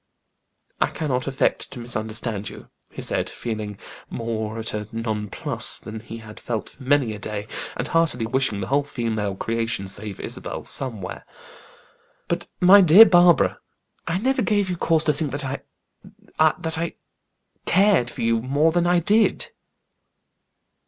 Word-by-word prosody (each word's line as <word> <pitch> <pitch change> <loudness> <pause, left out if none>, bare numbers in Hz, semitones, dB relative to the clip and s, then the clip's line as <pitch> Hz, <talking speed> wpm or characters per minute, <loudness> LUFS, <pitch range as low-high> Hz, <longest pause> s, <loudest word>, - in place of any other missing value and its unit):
"I - - +4
cannot 130 -5 -2
affect 135 -1 0
to 125 - -8
misunderstand 110 -2 -2
you," - - -12 0.2
he - - -8
said, - - 0
feeling 110 -3 -5 0.3
more 110 -1 -4
at 115 0 -2
a 105 -1 -4
nonplus 110 -3 -2
than 110 0 -8
he 115 +1 -9
had 110 -1 -11
felt 115 -3 -4
for - - -19
many 130 -4 +2
a 105 - -8
day, 105 -1 -5 0.3
and 125 - -2
heartily 160 -9 +1
wishing 115 -4 0
the - - -2
whole 140 +2 +3
female 110 -7 -2
creation, 115 -1 -2
save 100 +1 -5
Isabel, - - -5
somewhere. 110 -9 -2 1.0
"But - - -2
my 190 +3 +8
dear 185 +5 +9
Barbara. 175 -3 +4 0.5
I 165 - 0
never 260 +5 +1
gave 205 -2 +1
you - - -1
cause 165 -2 +2
to 150 - +2
think 145 -2 -1
I 135 +1 -4 0.8
that 160 +1 +2
I 170 0 -3 0.7
cared 190 - +4
for - - -6
you 115 0 +2
more 145 +6 +2
than 175 +1 +1
I 175 0 +4
did." 215 +6 +2
125 Hz, 150 wpm, -23 LUFS, 110-165 Hz, 1.0 s, dear